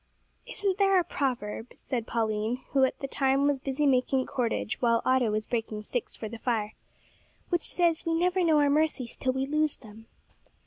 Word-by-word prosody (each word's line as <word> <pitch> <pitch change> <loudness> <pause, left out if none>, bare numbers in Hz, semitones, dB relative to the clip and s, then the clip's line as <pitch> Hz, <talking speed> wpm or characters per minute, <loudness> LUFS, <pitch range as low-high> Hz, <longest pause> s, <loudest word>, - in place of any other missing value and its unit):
"Isn't 400 -5 -2
there 390 -1 +5
a - - +1
proverb," 245 -6 -3
said 235 -3 -4
Pauline, 220 +1 -1
who 270 -1 +4
at 260 - -3
the 275 - -2
time 270 +1 +1
was 285 -2 +2
busy 275 +2 -1
making 260 -1 +2
cordage 240 -4 -2
while 230 -2 +2
Otto 255 -3 +3
was 215 0 -1
breaking 225 -3 -3
sticks 245 +2 -3
for 220 - -6
the 225 +1 -8
fire, 220 -3 -1 0.8
"which 345 -2 +1
says 340 -2 +2
that - - -4
we 330 - +1
never 360 +2 +2
know 320 -3 +4
our 290 -1 +4
mercies 295 -5 +1
till 255 - -1
we 265 +1 -1
lose 305 +1 +1
them?" 220 -1 -14
260 Hz, 190 wpm, -28 LUFS, 230-305 Hz, 0.8 s, there